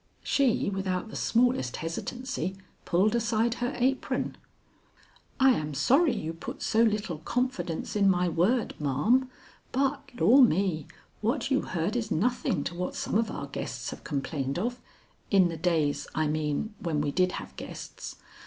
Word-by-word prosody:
She, 255 Hz, -7 st, +2 dB
without 190 Hz, 0 st, -2 dB
the -, -, -9 dB
smallest 235 Hz, -, +2 dB
hesitancy, 190 Hz, -, -4 dB, 0.3 s
pulled 195 Hz, +5 st, +3 dB
aside 230 Hz, 0 st, +1 dB
her 245 Hz, +2 st, 0 dB
apron. 260 Hz, +2 st, 0 dB, 1.0 s
"I 265 Hz, 0 st, +7 dB
am 150 Hz, -, -1 dB
sorry 275 Hz, -, +4 dB
you 160 Hz, +1 st, -3 dB
put 245 Hz, -, -7 dB
so 225 Hz, -, +3 dB
little 210 Hz, -7 st, +1 dB
confidence 245 Hz, -3 st, -2 dB
in 200 Hz, -2 st, +4 dB
my 180 Hz, -1 st, +2 dB
word, 190 Hz, +9 st, +1 dB
ma'am, 155 Hz, -, +2 dB, 0.4 s
but 275 Hz, +1 st, 0 dB
Lor' 265 Hz, +6 st, +7 dB
me, 185 Hz, -, +3 dB, 0.3 s
what 255 Hz, +5 st, 0 dB
you 270 Hz, -, +3 dB
heard 175 Hz, +5 st, -2 dB
is 225 Hz, -3 st, -1 dB
nothing 205 Hz, -, +1 dB
to -, -, -4 dB
what 180 Hz, +1 st, -3 dB
some -, -, -3 dB
of 220 Hz, +1 st, +2 dB
our 145 Hz, -, -4 dB
guests 140 Hz, -, -5 dB
have -, -, -9 dB
complained 140 Hz, -1 st, -2 dB
of 240 Hz, +6 st, -2 dB, 0.5 s
in 190 Hz, -4 st, +5 dB
the 165 Hz, -, -4 dB
days, 160 Hz, -4 st, +1 dB
I 155 Hz, -, +2 dB
mean, 155 Hz, +6 st, -1 dB
when 160 Hz, -4 st, -1 dB
we 145 Hz, -1 st, 0 dB
did 185 Hz, +3 st, +2 dB
have -, -, -7 dB
guests. -, -, -8 dB
195 Hz, 155 wpm, -28 LUFS, 160-245 Hz, 1.0 s, I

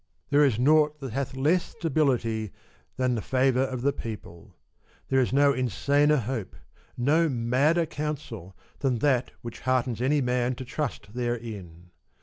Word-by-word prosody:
There 145 Hz, +1 st, +5 dB
is 130 Hz, -7 st, +3 dB
nought 150 Hz, +3 st, +3 dB
that 135 Hz, -5 st, -6 dB
hath 135 Hz, 0 st, -3 dB
less 155 Hz, +7 st, +2 dB
stability 125 Hz, -, -1 dB, 0.5 s
than 130 Hz, -1 st, +1 dB
the 115 Hz, -, -1 dB
favour 130 Hz, +1 st, +2 dB
of 130 Hz, -2 st, -2 dB
the 140 Hz, +1 st, +2 dB
people; 105 Hz, -9 st, -9 dB, 0.5 s
there 135 Hz, -, +3 dB
is 125 Hz, -, +1 dB
no 140 Hz, +1 st, +4 dB
insaner 140 Hz, +4 st, +2 dB
hope, 110 Hz, -5 st, -4 dB, 0.4 s
no 155 Hz, +6 st, +3 dB
madder 135 Hz, +7 st, +2 dB
counsel, 140 Hz, -, -5 dB, 0.2 s
than 135 Hz, -3 st, +1 dB
that 130 Hz, 0 st, +1 dB
which 115 Hz, -1 st, -7 dB
heartens 125 Hz, -2 st, 0 dB
any 145 Hz, +4 st, +2 dB
man 125 Hz, -1 st, 0 dB
to 130 Hz, +1 st, -7 dB
trust 130 Hz, -6 st, -4 dB
therein. 110 Hz, -8 st, -5 dB
130 Hz, 145 wpm, -27 LUFS, 120-145 Hz, 0.5 s, There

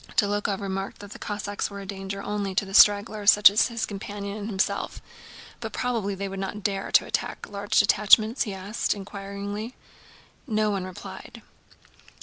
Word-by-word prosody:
Dólokhov 205 Hz, -1 st, +1 dB
remarked 195 Hz, 0 st, -4 dB
that 205 Hz, -1 st, -11 dB
the -, -, -9 dB
Cossacks 205 Hz, -1 st, -3 dB
were 200 Hz, -1 st, -8 dB
a 200 Hz, -, -8 dB
danger 195 Hz, 0 st, -6 dB
only 205 Hz, -2 st, -3 dB
to 195 Hz, 0 st, -1 dB
stragglers 205 Hz, +1 st, +5 dB
such 210 Hz, -1 st, +8 dB
as 210 Hz, -, +3 dB
his 230 Hz, -2 st, -2 dB
companion 200 Hz, 0 st, -6 dB
and 210 Hz, 0 st, -5 dB
himself, 195 Hz, -2 st, -1 dB, 0.6 s
"but -, -, -6 dB
probably 225 Hz, -6 st, -1 dB
they 200 Hz, +1 st, -4 dB
would 195 Hz, 0 st, -6 dB
not 195 Hz, +1 st, -5 dB
dare 195 Hz, -2 st, -2 dB
to -, -, +6 dB
attack -, -, -3 dB
large 205 Hz, 0 st, -2 dB
detachments?" 215 Hz, +4 st, +5 dB
he 210 Hz, -5 st, 0 dB
added 200 Hz, +5 st, -2 dB
inquiringly. 200 Hz, +3 st, -6 dB, 0.7 s
No 215 Hz, -2 st, +1 dB
one 195 Hz, -2 st, -2 dB
replied. 185 Hz, -1 st, -10 dB
205 Hz, 160 wpm, -26 LUFS, 195-210 Hz, 0.7 s, such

